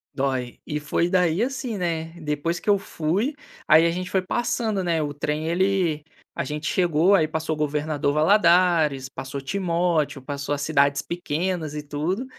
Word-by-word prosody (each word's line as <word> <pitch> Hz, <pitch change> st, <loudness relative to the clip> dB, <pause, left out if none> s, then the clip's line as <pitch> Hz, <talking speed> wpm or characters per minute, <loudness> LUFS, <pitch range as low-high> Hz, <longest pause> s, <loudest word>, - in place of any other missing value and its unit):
Dói. 130 Hz, -3 st, -2 dB
E 150 Hz, -, -2 dB
foi 150 Hz, +3 st, 0 dB
daí 180 Hz, 0 st, +2 dB
assim, 250 Hz, -3 st, -2 dB
né, 165 Hz, -3 st, -2 dB
depois 155 Hz, +2 st, -2 dB
que -, -, -4 dB
eu 205 Hz, -, +5 dB
fui, 195 Hz, -, -1 dB, 0.3 s
aí 160 Hz, +2 st, +6 dB
a -, -, +1 dB
gente 180 Hz, +2 st, -4 dB
foi 190 Hz, -, +2 dB
passando, 225 Hz, -1 st, -1 dB
né? 170 Hz, -2 st, +1 dB
O 145 Hz, -1 st, -3 dB
trem, 150 Hz, +2 st, -2 dB
ele 175 Hz, -3 st, +1 dB, 0.3 s
a -, -, -1 dB
gente 150 Hz, 0 st, -4 dB
chegou, 175 Hz, +1 st, +3 dB
aí 160 Hz, -5 st, +3 dB
passou 160 Hz, 0 st, -2 dB
o -, -, -11 dB
governador 150 Hz, -1 st, -1 dB
Valladares, 165 Hz, -4 st, +4 dB
passou 135 Hz, +1 st, -6 dB
Timóteo, 170 Hz, -2 st, 0 dB
passou 140 Hz, +1 st, -4 dB
as 145 Hz, -, -3 dB
cidades 140 Hz, -2 st, +2 dB
pequenas 170 Hz, -1 st, -3 dB
e 150 Hz, -, -4 dB
tudo. 155 Hz, -, -2 dB
160 Hz, 170 wpm, -24 LUFS, 150-185 Hz, 0.3 s, aí